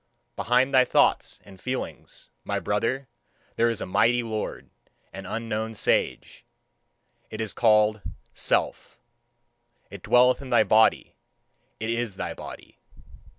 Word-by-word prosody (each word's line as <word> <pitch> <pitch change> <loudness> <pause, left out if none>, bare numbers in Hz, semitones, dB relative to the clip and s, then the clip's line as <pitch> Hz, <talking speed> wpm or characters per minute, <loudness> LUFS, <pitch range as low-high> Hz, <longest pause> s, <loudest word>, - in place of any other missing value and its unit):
Behind 125 +3 +1
thy 130 -1 +6
thoughts 125 - +1
and 95 -2 -16
feelings, 130 0 -6
my - - -2
brother, 115 +6 -2 0.5
there 115 +1 +2
is 115 - -2
a - - -3
mighty 115 +6 +2
lord, 110 -2 -5 0.4
an 95 -1 -8
unknown 110 +1 -4
sage - - -1 0.9
it 110 - -8
is 110 -2 -2
called 105 -2 +3 0.3
Self; - - -1 0.9
it - - -9
dwelleth 125 +2 +4
in 135 - -9
thy 120 -3 +4
body, 110 +1 +2 0.6
it 110 +1 -2
is 115 -4 -2
thy - - -4
body. - - -11
115 Hz, 125 wpm, -25 LUFS, 105-125 Hz, 0.9 s, thy